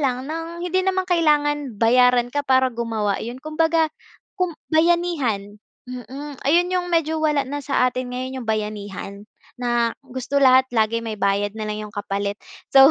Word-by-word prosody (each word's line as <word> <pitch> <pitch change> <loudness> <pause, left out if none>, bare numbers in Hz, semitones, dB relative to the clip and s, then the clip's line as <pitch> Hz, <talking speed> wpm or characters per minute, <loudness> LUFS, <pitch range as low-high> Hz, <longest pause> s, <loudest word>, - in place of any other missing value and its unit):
lang 255 -2 0
ng 330 +3 -5
hindi 370 +1 +1
namang 375 0 0
kailangan 295 - +1
bayaran 245 +2 +4
ka, 290 - +1
para 260 -2 +2
gumawa, 225 -4 -1
'yon 240 +2 -5
kumbaga 315 +2 +1 0.4
kum 365 -5 -2 0.2
bayanihan, 315 - +1 0.2
mm, 260 +3 -8
ayun 350 +5 +3
yung 360 -1 0
medyo 320 -2 +1
wala 300 -3 +2
na 290 +2 -4
sa 275 -2 +1
atin 255 0 -3
ngayon 260 +1 -4
yung 235 - -9
bayanihan 210 -1 -4 0.3
na 240 -1 0
gusto 265 +1 -2
lahat 260 0 +6
lagi 220 0 +2
may 225 -1 -4
bayad 200 0 0
nalang 215 -1 -4
yung 210 - -14
kapalit, 200 -1 -2 0.4
so 270 +1 +9
260 Hz, 160 wpm, -22 LUFS, 225-310 Hz, 0.4 s, so